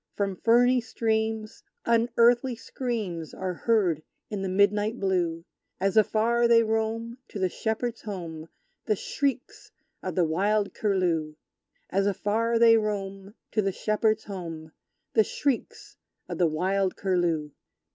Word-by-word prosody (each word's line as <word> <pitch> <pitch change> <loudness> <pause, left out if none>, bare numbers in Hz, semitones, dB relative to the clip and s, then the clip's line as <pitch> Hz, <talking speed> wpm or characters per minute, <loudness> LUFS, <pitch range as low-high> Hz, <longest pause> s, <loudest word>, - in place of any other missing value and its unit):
From 200 -2 -1
ferny 245 +5 +4
streams, 220 -2 -2 0.2
unearthly 235 +2 +3
screams 215 - -4
Are 185 -1 -3
heard 185 -6 +1 0.3
in 205 -2 -3
the 190 - -2
midnight 205 +4 +2
blue; 175 -4 0 0.3
As 195 +1 0
afar 225 +2 +3
they 230 -1 +6
roam 225 +2 -2
to - - -8
the 190 -2 +1
shepherd's 225 +4 -3
home, 165 -6 -7 0.4
The 215 - +2
shrieks 280 - -3 0.3
of 185 -3 -4
the 180 - +3
wild 200 +5 +1
Curlew! 175 -7 0 0.6
As 195 +1 +2
afar 220 +4 +1
they 230 0 +7
roam 200 -1 -3 0.2
To 215 - +2
the 195 -1 0
shepherd's 215 +2 0
home, 165 -5 -7 0.4
The 220 - +5
shrieks 270 +2 -3 0.3
of - - -5
the 175 - +4
wild 185 +4 0
Curlew! 175 -6 0
210 Hz, 130 wpm, -27 LUFS, 185-230 Hz, 0.6 s, they